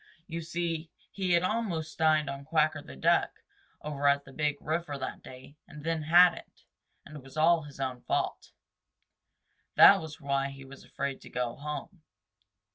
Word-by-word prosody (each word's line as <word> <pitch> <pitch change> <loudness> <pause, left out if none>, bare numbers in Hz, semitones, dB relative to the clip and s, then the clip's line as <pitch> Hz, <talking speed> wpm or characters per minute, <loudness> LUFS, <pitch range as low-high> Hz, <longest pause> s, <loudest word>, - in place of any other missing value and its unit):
You 170 -1 -5
see, 165 -1 -3 0.2
he 185 -3 -1
had 170 +1 +3
almost 185 -7 -2
dined 155 -2 +3
on 140 0 -5
Quacker 155 +1 +1
the 70 - -12
Duck 65 - +1 0.4
over 145 -1 -1
at 140 0 +3
the 135 - -14
Big 150 -1 -1
River 155 -2 -3
that 130 - -6
day 130 +3 -13
and 150 -1 -11
then 165 0 -1
hadn't, 175 +3 +3 0.4
and 150 - -12
it - - -10
was 135 +3 -14
all 165 +1 +4
his 145 -2 -12
own 130 -2 -3
fault. - - -2 1.2
That - - +8
was 155 -2 -9
why 140 -2 -1
he 135 0 -11
was 135 0 -13
afraid 140 -1 -4
to - - -12
go 125 -1 -3
home. 150 +4 -7
150 Hz, 170 wpm, -29 LUFS, 140-165 Hz, 1.2 s, That